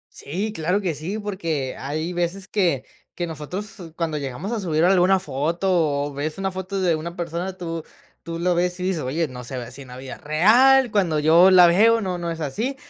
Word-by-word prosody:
Sí, 195 Hz, +9 st, -4 dB
claro 180 Hz, +4 st, 0 dB
que 175 Hz, -6 st, -2 dB
sí, 185 Hz, +9 st, -4 dB
porque 165 Hz, -10 st, -3 dB
hay 155 Hz, +5 st, -3 dB
veces 175 Hz, +2 st, -2 dB
que 170 Hz, -11 st, 0 dB, 0.3 s
que 175 Hz, -, -3 dB
nosotros 170 Hz, +4 st, -7 dB
cuando 160 Hz, -3 st, -1 dB
llegamos 140 Hz, -, -5 dB
a 225 Hz, -, -2 dB
subir 165 Hz, -2 st, +1 dB
alguna 190 Hz, 0 st, +4 dB
foto, 155 Hz, 0 st, 0 dB
o 145 Hz, -, -6 dB
ves 150 Hz, +5 st, -4 dB
una 195 Hz, 0 st, -2 dB
foto 190 Hz, +1 st, -4 dB
de 170 Hz, -3 st, +2 dB
una 170 Hz, +2 st, -6 dB
persona, 175 Hz, +2 st, -4 dB
tú 165 Hz, -2 st, -5 dB, 0.4 s
tú 165 Hz, 0 st, -5 dB
lo 175 Hz, 0 st, +1 dB
ves 180 Hz, +1 st, 0 dB
y 180 Hz, -, -4 dB
dices: 185 Hz, -4 st, -1 dB
"Oye, 155 Hz, +6 st, -1 dB
no 125 Hz, -2 st, -9 dB
se 130 Hz, +1 st, -6 dB
ve 120 Hz, -, -5 dB
así 130 Hz, +4 st, -11 dB
en 130 Hz, -, -15 dB
la 125 Hz, -, -9 dB
vida 130 Hz, 0 st, -8 dB
real. 235 Hz, -, +5 dB
Cuando 180 Hz, -8 st, +1 dB
yo 165 Hz, +5 st, +6 dB
la 180 Hz, -2 st, +8 dB
veo 225 Hz, +6 st, +4 dB
no 185 Hz, -3 st, -2 dB
no 170 Hz, -1 st, -3 dB
es 165 Hz, -, -6 dB
así". 215 Hz, -, -2 dB
170 Hz, 215 wpm, -23 LUFS, 155-190 Hz, 0.4 s, la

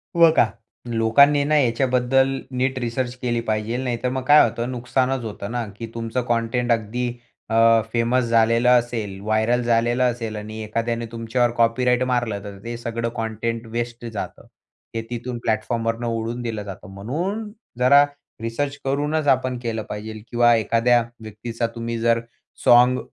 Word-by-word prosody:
व 170 Hz, -1 st, +7 dB
का. -, -, +6 dB, 0.4 s
लोकांनी 120 Hz, +6 st, +4 dB
आहे 140 Hz, -, +1 dB
ना 155 Hz, -, +2 dB
याच्याबद्दल 130 Hz, 0 st, +2 dB, 0.3 s
नीट 130 Hz, +1 st, 0 dB
रिसर्च 120 Hz, +1 st, -2 dB
केली 120 Hz, -2 st, 0 dB
पाहिजे. 110 Hz, +2 st, -1 dB
नाहीतर 125 Hz, -1 st, -2 dB
मग 130 Hz, +1 st, -2 dB
काय 150 Hz, +2 st, +8 dB
होतं 115 Hz, +1 st, -1 dB
नुकसानच 125 Hz, +1 st, -1 dB
होतं 100 Hz, -1 st, -6 dB
ना 120 Hz, -1 st, -2 dB
की 115 Hz, 0 st, -6 dB
तुमचं 115 Hz, +2 st, -2 dB
कंटेंट 120 Hz, +1 st, 0 dB
अगदी 115 Hz, +2 st, 0 dB, 0.4 s
अ, 115 Hz, 0 st, +5 dB
फेमस 120 Hz, +2 st, +2 dB
झालेलं 115 Hz, +1 st, +4 dB
असेल, 110 Hz, -5 st, -5 dB
व्हायरल 110 Hz, +4 st, +1 dB
झालेलं 120 Hz, +1 st, +2 dB
असेल 115 Hz, -3 st, -1 dB
आणि 110 Hz, +1 st, -7 dB
एखाद्याने 115 Hz, +2 st, -2 dB
तुमच्यावर 115 Hz, +1 st, 0 dB
कॉपीराईट 125 Hz, +2 st, +2 dB
मारलं, 115 Hz, -5 st, -1 dB
तर 100 Hz, -1 st, -8 dB
ते 120 Hz, 0 st, -5 dB
सगळं 115 Hz, 0 st, -3 dB
कंटेंट 115 Hz, +1 st, -3 dB
वेस्ट 120 Hz, 0 st, -4 dB
जातं. 110 Hz, -3 st, -6 dB, 0.5 s
हे 115 Hz, -, -1 dB
तिथून 120 Hz, 0 st, -4 dB
प्लॅटफॉर्मवरून 115 Hz, +2 st, -1 dB
उडवून 115 Hz, +1 st, -2 dB
दिलं 115 Hz, -3 st, -4 dB
जातं. 95 Hz, -3 st, -9 dB
म्हणून 175 Hz, -, -3 dB, 0.3 s
जरा 140 Hz, +3 st, +7 dB, 0.4 s
रिसर्च 135 Hz, +5 st, -2 dB
करूनच 145 Hz, +3 st, 0 dB
आपण 130 Hz, -1 st, +2 dB
केलं 115 Hz, -2 st, -2 dB
पाहिजे 110 Hz, +1 st, -6 dB
किंवा 120 Hz, 0 st, +5 dB
एखाद्या 115 Hz, +2 st, +3 dB, 0.2 s
व्यक्तीचा 115 Hz, +2 st, -4 dB
तुम्ही 115 Hz, 0 st, -3 dB
जर 115 Hz, 0 st, +3 dB, 0.5 s
साँग 125 Hz, +1 st, +6 dB
120 Hz, 150 wpm, -22 LUFS, 115-125 Hz, 0.5 s, काय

